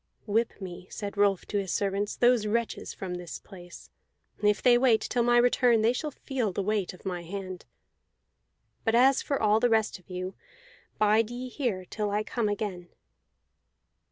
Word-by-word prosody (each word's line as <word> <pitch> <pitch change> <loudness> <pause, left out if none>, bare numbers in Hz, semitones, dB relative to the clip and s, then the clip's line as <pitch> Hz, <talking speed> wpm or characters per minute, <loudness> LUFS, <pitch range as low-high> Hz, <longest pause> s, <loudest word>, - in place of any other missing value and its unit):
"Whip 225 +1 0
me," 185 -1 -8
said 205 -1 -6
Rolf 200 -2 +2
to 205 - -1
his 195 -2 -3
servants, 200 +1 -1
"these 240 -3 +3
wretches 230 +2 -2
from 185 -2 -6
this 180 -1 -6
place; 175 -3 -13 0.5
if 210 0 +3
they 245 -1 +5
wait 240 -3 +4
till 245 - 0
my 240 +1 +4
return 240 -2 +4
they 230 +2 +4
shall 300 +4 -3
feel 260 -7 -3
the 195 +2 -2
weight 210 -2 0
of 180 - -16
my 180 -2 -3
hand. 185 +1 -7 1.2
But 225 0 +2
as 260 +3 +5
for 280 - -1
all 215 0 +3
the 245 +1 +3
rest 220 -3 +1
of 180 - -27
you, 185 +1 -4 0.6
bide 215 +1 +3
ye 250 +1 -6
here 235 -9 -2
till 210 +3 -3
I 210 +1 0
come 220 -1 -1
again." 195 -4 -4
210 Hz, 175 wpm, -28 LUFS, 190-235 Hz, 1.2 s, they